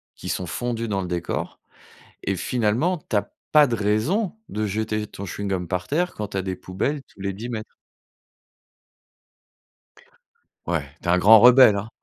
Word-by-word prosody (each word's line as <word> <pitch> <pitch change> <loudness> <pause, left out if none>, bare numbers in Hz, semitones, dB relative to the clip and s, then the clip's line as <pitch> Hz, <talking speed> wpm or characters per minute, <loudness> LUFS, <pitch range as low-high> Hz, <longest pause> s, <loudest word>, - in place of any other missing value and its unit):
qui - - -8
sont 90 - -2
fondus 115 +4 -3
dans 100 -2 -1
le 90 - -4
décor 85 -1 -4 0.6
et 100 - -1
finalement, 125 - 0
tu 110 - 0
as 100 0 -1 0.2
pas 150 -1 +7
de 120 - -1
raison 115 - 0
de 110 0 -2
jeter 110 +1 -2
ton 100 - -9
chewing-gum 95 -1 -3
par 90 +1 -2
terre 175 +5 0
quand 105 -1 -5
tu - - -7
as 95 - 0
des 95 -1 -4
poubelles 100 +12 -3
tous - - -19
les 100 0 -2
10 110 +5 -7
mètres. 110 -3 -6 2.9
Ouais, 85 -4 0 0.2
tu - - -6
es - - +5
un 90 - +4
grand 110 +4 +8
rebelle, 125 -3 +8
hein, 100 +2 -4
105 Hz, 175 wpm, -23 LUFS, 95-120 Hz, 2.9 s, grand